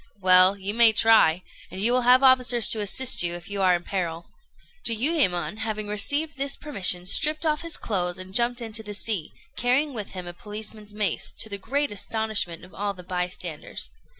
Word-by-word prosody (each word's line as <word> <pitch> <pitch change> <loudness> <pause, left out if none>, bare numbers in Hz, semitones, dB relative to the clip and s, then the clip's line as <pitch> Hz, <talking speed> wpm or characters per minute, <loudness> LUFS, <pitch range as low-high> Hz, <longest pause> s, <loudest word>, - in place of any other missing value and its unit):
"Well, 185 +1 +5
you 200 +1 -4
may 230 -1 +7
try; 210 -6 +3 0.3
and 185 - -8
you 225 +5 +2
will 250 0 +2
have 250 +2 +4
officers 250 -3 +4
to 220 - +1
assist 235 +5 +3
you, 175 0 +1
if 175 +2 -10
you 200 -1 -3
are 185 -1 +3
in 175 - -5
peril." 170 -3 -4 0.6
Jiuyémon, 220 - 0
having 215 -1 -4
received 285 +9 -1
this 275 +1 0
permission, 185 -11 +3
stripped 305 - +1
off 305 -1 0
his 335 -1 -2
clothes 180 -4 -3
and 185 0 -9
jumped 240 +2 +1
into 225 -1 0
the 210 -1 -7
sea, 200 -7 -1 0.2
carrying 265 +4 +1
with 210 -4 -6
him 185 -1 -7
a 175 - -8
policeman's 210 +2 -8
mace, 205 -4 -2
to 220 - -4
the 200 -1 -5
great 285 +6 -2
astonishment 205 -4 -2
of 180 - -19
all 205 0 -4
the 180 - -12
bystanders. 180 -3 -6
210 Hz, 190 wpm, -24 LUFS, 185-245 Hz, 0.6 s, may